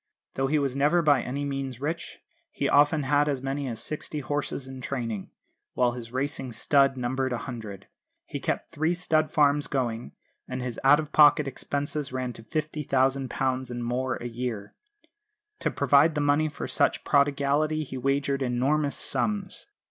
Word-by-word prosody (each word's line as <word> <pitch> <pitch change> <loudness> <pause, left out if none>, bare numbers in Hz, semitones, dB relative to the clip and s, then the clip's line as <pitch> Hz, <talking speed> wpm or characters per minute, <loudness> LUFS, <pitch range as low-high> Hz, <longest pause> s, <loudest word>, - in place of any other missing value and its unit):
Though 135 0 0
he 155 +3 +2
was 140 -3 0
never 150 +5 +3
by 145 -4 +4
any 140 +4 -3
means 135 -3 -4
rich, 160 +4 -4 0.3
he - - -2
often 145 +1 +4
had 145 +2 +2
as 135 -2 -2
many 135 +1 -2
as 115 -3 -4
sixty 155 0 -5
horses 145 -1 -3
in 130 -1 -8
training, 115 -6 -4 0.5
while 125 -1 +3
his 120 -2 -8
racing 130 -1 -3
stud 135 +3 +3
numbered 130 +1 -1
a 120 - 0
hundred. 110 -7 -7 0.4
He - - -5
kept - - -3
three 160 +3 0
stud 155 -3 +1
farms 145 -1 +3
going, 120 -4 -2 0.3
and 130 0 -4
his 125 -2 -4
out 140 +3 +6
of 155 -1 -5
pocket 150 -1 +6
expenses 140 +1 -3
ran 130 -1 -3
to - - -12
£50,000 135 -2 -1
and 120 -1 -4
more 125 +1 -1
a - - -8
year. 115 -4 -5 0.9
To - - 0
provide 150 +3 +4
the - - 0
money 145 +2 +2
for 145 - -6
such - - +1
prodigality 145 +2 +2
he 130 - -8
wagered 140 +1 0
enormous 135 +4 +1
sums. 205 -3 -1
140 Hz, 165 wpm, -27 LUFS, 125-145 Hz, 0.9 s, out